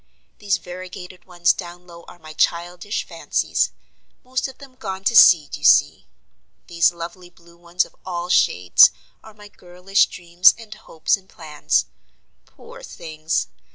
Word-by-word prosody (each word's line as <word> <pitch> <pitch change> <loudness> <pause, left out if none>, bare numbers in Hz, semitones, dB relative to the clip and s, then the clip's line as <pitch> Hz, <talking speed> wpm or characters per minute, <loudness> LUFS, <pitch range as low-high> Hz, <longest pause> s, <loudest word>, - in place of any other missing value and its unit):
These 205 0 0
variegated 180 -1 -11
ones 175 -1 +1
down 175 0 -10
low 170 -1 -15
are - - -14
my 155 -2 -13
childish 175 +5 -2
fancies; - - -2 0.5
most 255 +1 -3
of 265 - -13
them 275 -2 -15
gone 195 -6 -7
to 235 - 0
seed 160 -9 +6
you - - -14
see. - - +3 0.6
These 170 -1 +2
lovely 175 +1 -10
blue 170 -1 -22
ones 170 +1 -2
of - - -21
all 175 -1 -5
shades 90 - +5 0.3
are 220 -1 -15
my 210 -1 -14
girlish 180 0 -1
dreams 175 0 +3
and 225 -2 -12
hopes 165 -6 -2
and 190 -1 -23
plans. 150 - -2 0.6
Poor - - -15
things! 155 0 -4
175 Hz, 150 wpm, -21 LUFS, 170-195 Hz, 0.6 s, seed